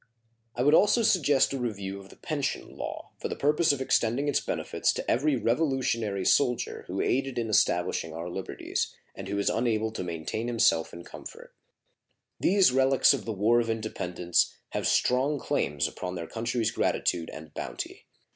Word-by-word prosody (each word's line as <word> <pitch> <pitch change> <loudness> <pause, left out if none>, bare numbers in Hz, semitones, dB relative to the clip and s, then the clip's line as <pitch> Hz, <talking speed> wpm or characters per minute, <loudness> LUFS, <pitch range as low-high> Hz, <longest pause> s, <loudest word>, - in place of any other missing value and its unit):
I 125 - 0
would 145 +3 +4
also 210 +7 +5
suggest 145 -10 +3
a 135 - -2
review 100 -5 -4
of 95 0 -13
the - - -14
pension 150 -4 -3
law, - - -6
for - - -3
the - - -4
purpose 150 +3 +3
of 140 - -2
extending 130 +2 +1
its 145 - +2
benefits - - -1
to - - -5
every 145 +4 +2
Revolutionary 115 - 0
soldier 125 -4 +1
who - - -2
aided 135 +1 0
in 115 -2 -1
establishing 80 -5 +1
our 85 +2 -6
liberties, 90 +2 -4 0.2
and - - -8
who 100 +1 -2
is 100 - -1
unable 110 -1 +1
to 110 - -4
maintain 85 +7 -4
himself 115 -9 +2
in 85 - -9
comfort. - - -11 0.9
These 195 -5 +4
relics 130 0 +4
of - - -4
the 115 - -3
War 110 +4 +3
of 115 -1 -1
Independence 90 -6 0 0.2
have - - -1
strong 135 +4 +2
claims 75 - 0
upon 90 0 -6
their 85 -1 -4
country's 115 +2 -1
gratitude 85 -6 0
and 80 0 -10
bounty. - - -6
115 Hz, 170 wpm, -28 LUFS, 95-135 Hz, 0.9 s, also